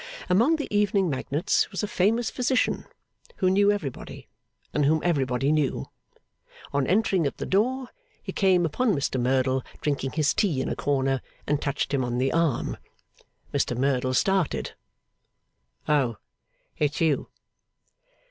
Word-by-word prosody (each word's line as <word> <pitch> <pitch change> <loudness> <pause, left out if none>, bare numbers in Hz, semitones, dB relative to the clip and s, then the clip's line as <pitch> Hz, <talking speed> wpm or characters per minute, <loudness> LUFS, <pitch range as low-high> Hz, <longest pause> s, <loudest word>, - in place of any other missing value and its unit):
Among 235 - +4
the 300 - -4
evening 200 -4 +2
magnates 145 +7 0
was 195 - -4
a - - 0
famous 220 +5 +1
physician, 255 0 0 0.5
who 185 -2 +2
knew 200 +1 +4
everybody, 155 -11 -5 0.5
and 150 - +1
whom 155 +3 +3
everybody 135 -5 +1
knew. 150 -3 0 0.8
On 140 -2 +1
entering 190 -4 +2
at - - -5
the - - -4
door, 250 +6 0 0.3
he - - -5
came 185 -3 +3
upon 210 - +1
Mr 135 -3 -1
Merdle 130 +1 +1 0.2
drinking 135 -3 -2
his 150 -2 +2
tea 175 -11 +1
in - - -1
a - - -2
corner, 135 -2 0 0.2
and 150 0 0
touched 140 0 -2
him 135 -2 +1
on 120 0 -2
the 130 +2 +1
arm. 165 -7 0 0.8
Mr 120 - 0
Merdle 130 -1 +1
started. 190 +1 +1 1.2
'Oh! 135 -7 +2 0.6
It's 150 -1 0
you! 160 -4 +1
150 Hz, 140 wpm, -26 LUFS, 135-195 Hz, 1.2 s, Among